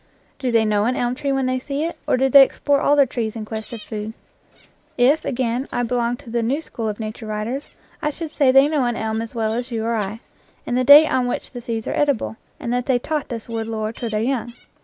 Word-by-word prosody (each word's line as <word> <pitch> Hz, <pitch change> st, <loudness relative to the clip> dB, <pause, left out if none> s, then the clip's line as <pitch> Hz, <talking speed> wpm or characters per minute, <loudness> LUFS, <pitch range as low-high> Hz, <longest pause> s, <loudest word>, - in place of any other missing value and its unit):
Do 260 Hz, -3 st, -1 dB
they 225 Hz, -1 st, +3 dB
know 210 Hz, -1 st, +2 dB
an 250 Hz, +2 st, +1 dB
elm 245 Hz, -1 st, 0 dB
tree 275 Hz, +2 st, -2 dB
when 270 Hz, -1 st, 0 dB
they 255 Hz, 0 st, 0 dB
see 280 Hz, +3 st, -3 dB
it, 335 Hz, -, -3 dB
or -, -, +3 dB
do 265 Hz, +1 st, +3 dB
they 275 Hz, +1 st, +8 dB
explore 280 Hz, +1 st, +2 dB
all 290 Hz, -, +4 dB
the 285 Hz, -1 st, +5 dB
trees 230 Hz, -3 st, -3 dB
in 220 Hz, -1 st, -5 dB
quest 220 Hz, 0 st, -6 dB
of 230 Hz, -3 st, -7 dB
food? 215 Hz, 0 st, -5 dB, 0.8 s
If, 275 Hz, +6 st, +4 dB
again, 245 Hz, +1 st, -1 dB
I 245 Hz, -, -1 dB
belonged 240 Hz, 0 st, 0 dB
to 230 Hz, -, -11 dB
the 235 Hz, 0 st, 0 dB
new 255 Hz, +6 st, 0 dB
school 230 Hz, -8 st, -5 dB
of 210 Hz, -, -5 dB
nature 220 Hz, +1 st, -6 dB
writers, 215 Hz, +7 st, -3 dB, 0.3 s
I 300 Hz, -, 0 dB
should 315 Hz, +1 st, -6 dB
say 275 Hz, -4 st, +3 dB
they 270 Hz, +2 st, +6 dB
know 295 Hz, -4 st, +1 dB
an 240 Hz, -1 st, 0 dB
elm 220 Hz, 0 st, -2 dB
as 230 Hz, +1 st, -7 dB
well 220 Hz, -1 st, 0 dB
as 245 Hz, +2 st, -3 dB
you 225 Hz, -2 st, -3 dB
or 230 Hz, -, 0 dB
I, 215 Hz, 0 st, -3 dB, 0.4 s
and 245 Hz, -, -2 dB
the 255 Hz, -, +2 dB
date 290 Hz, +4 st, +9 dB
on 255 Hz, -3 st, +1 dB
which 245 Hz, -, -4 dB
the 245 Hz, -, -7 dB
seeds 230 Hz, -2 st, -4 dB
are -, -, -2 dB
edible, 285 Hz, -6 st, 0 dB, 0.2 s
and 240 Hz, -, -3 dB
that 245 Hz, 0 st, -1 dB
they 260 Hz, -2 st, +3 dB
taught 300 Hz, +3 st, -3 dB
this 230 Hz, -2 st, -6 dB
wood 225 Hz, -1 st, -3 dB
lore 220 Hz, -1 st, -3 dB
to 235 Hz, 0 st, -4 dB
their 215 Hz, 0 st, -1 dB
young. 240 Hz, -2 st, -2 dB
240 Hz, 260 wpm, -21 LUFS, 225-270 Hz, 0.8 s, date